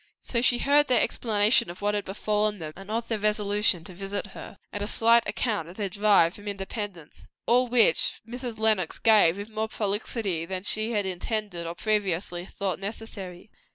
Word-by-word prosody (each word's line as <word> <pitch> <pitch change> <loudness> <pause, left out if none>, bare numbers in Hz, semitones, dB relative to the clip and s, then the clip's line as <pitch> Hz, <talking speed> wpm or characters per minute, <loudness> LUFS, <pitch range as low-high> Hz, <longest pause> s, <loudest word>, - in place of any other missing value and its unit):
So 235 - -2
she 245 0 +4
heard 285 +3 +3
their 250 - +3
explanation 210 -3 +2
of 175 - -9
what 205 0 0
had 205 -1 -2
befallen 210 +1 -1
them, 155 -3 -7
and 195 +2 -11
of 230 +2 -2
their 225 -2 -1
resolution 210 -3 +1
to 180 - -9
visit 195 +3 -4
her; - - -10 0.2
and 205 - -4
a 205 - -2
slight 230 +2 +4
account 210 -9 -2
of 180 - -12
their 205 -3 -2
drive 200 -4 +3
from 205 0 -12
Independence; 195 -4 -6 0.2
all 250 +2 +3
which 240 -1 +3
Mrs. 245 -1 -5
Lenox 215 -6 +2
gave 210 -6 +5
with 205 +2 -7
more 220 0 -2
prolixity 205 -4 -2
than 185 0 -3
she 215 +2 +1
had 205 -2 0
intended 190 -1 -3
or 170 - -5
previously 185 -4 -1
thought 195 -2 -3
necessary. 200 -2 -8
205 Hz, 185 wpm, -26 LUFS, 190-220 Hz, 0.2 s, gave